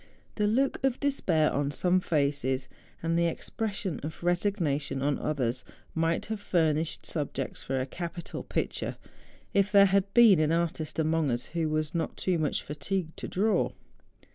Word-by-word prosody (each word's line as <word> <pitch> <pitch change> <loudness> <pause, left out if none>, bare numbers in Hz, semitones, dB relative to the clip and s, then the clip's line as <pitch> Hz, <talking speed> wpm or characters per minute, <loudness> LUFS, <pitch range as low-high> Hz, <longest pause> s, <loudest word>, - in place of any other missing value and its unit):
The 210 -1 +1
look 260 +5 +1
of 265 -2 +1
despair 180 - +2
on 140 0 0
some 180 +5 +2
faces, 140 -5 0 0.4
and 165 0 +1
the 170 - +3
ex¬ 165 - -3
pression 200 -5 -2
of 155 +3 -7
resignation 170 -7 0
on 145 0 +1
others, 125 -4 -1 0.3
might 165 +1 0
have 215 -1 -5
fur¬ 165 -5 +3
nished 160 +2 -3
subjects 140 -4 -3
for 135 0 -2
a 130 - -1
capital 170 +4 -6
picture, - - -3 0.6
if 200 0 +3
there 200 -1 +8
had 195 0 +2
been 225 -8 +8
an 155 0 +2
artist 165 -2 -1
among 160 -1 +2
us 120 0 -1
who 165 -2 0
was 155 0 -1
not 170 - -2
too 180 -3 0
much 155 -2 0
fatigued 160 +3 -3
to - - -5
draw. 210 +3 +1
165 Hz, 165 wpm, -29 LUFS, 150-195 Hz, 0.6 s, there